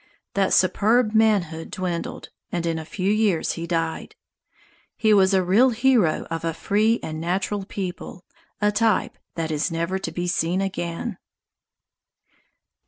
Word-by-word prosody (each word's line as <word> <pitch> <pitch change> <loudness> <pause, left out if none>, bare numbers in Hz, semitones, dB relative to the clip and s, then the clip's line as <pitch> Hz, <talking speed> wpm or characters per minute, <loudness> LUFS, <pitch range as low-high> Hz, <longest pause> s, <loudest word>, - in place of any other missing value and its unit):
That 195 -1 +1
superb 215 +4 +3
manhood 195 -8 +2
dwindled, 180 -2 -4 0.2
and 170 -1 -2
in 165 -1 -1
a 160 - -7
few 190 +4 -1
years 210 -6 +1
he 170 0 -5
died. 165 -1 -2 0.8
He 220 -1 +3
was 190 -1 +5
a 190 -1 +3
real 210 +9 +4
hero 235 -7 +2
of 165 0 -3
a 165 -1 -2
free 215 +5 +1
and 155 0 -5
natural 190 +3 -2
people, 185 -2 -6 0.3
a 210 0 +2
type 215 -1 +1 0.2
that 160 -1 -2
is 155 +3 0
never 170 +3 -2
to 165 - -5
be 175 +2 -3
seen 175 +1 0
again. 190 +2 -3
185 Hz, 145 wpm, -23 LUFS, 165-210 Hz, 0.8 s, was